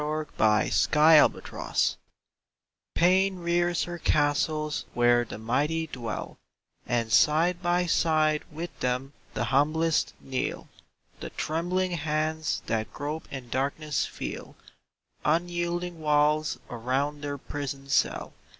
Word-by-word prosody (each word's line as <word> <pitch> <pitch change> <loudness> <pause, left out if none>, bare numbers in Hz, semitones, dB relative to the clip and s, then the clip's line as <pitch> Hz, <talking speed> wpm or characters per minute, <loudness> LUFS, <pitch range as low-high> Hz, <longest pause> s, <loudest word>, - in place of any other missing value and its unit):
Zbc 150 -8 +1
Ibouse 155 0 +4 0.3
of - - -19 1.0
pain 190 +3 +4
AIN 175 - -10
rears 175 0 +1
her 175 0 -6
castles 150 0 +1
where 120 0 +4
the 110 - -8
mighty 145 +9 0
dwell 120 -7 -6 0.5
And 115 -2 0
side 165 +9 +4
by 175 0 +1
side 155 -2 +2
with 165 +3 -7
them 125 +2 -2 0.2
the - - 0
humblest 155 +4 +1
kneel; 130 -1 -3 0.5
The - - -6
trembling 180 +4 -1
hands 155 -1 -1
that 110 -1 -2
grope 150 +3 -5
in 130 -3 -7
darkness 145 +3 -1
feel - - -7 0.7
Unyielding 175 +1 -1
walls 150 0 +2
around 135 +5 -2
their 145 -1 -4
prison 140 0 -6
cell. 135 - 0
150 Hz, 115 wpm, -27 LUFS, 135-165 Hz, 1.0 s, Ibouse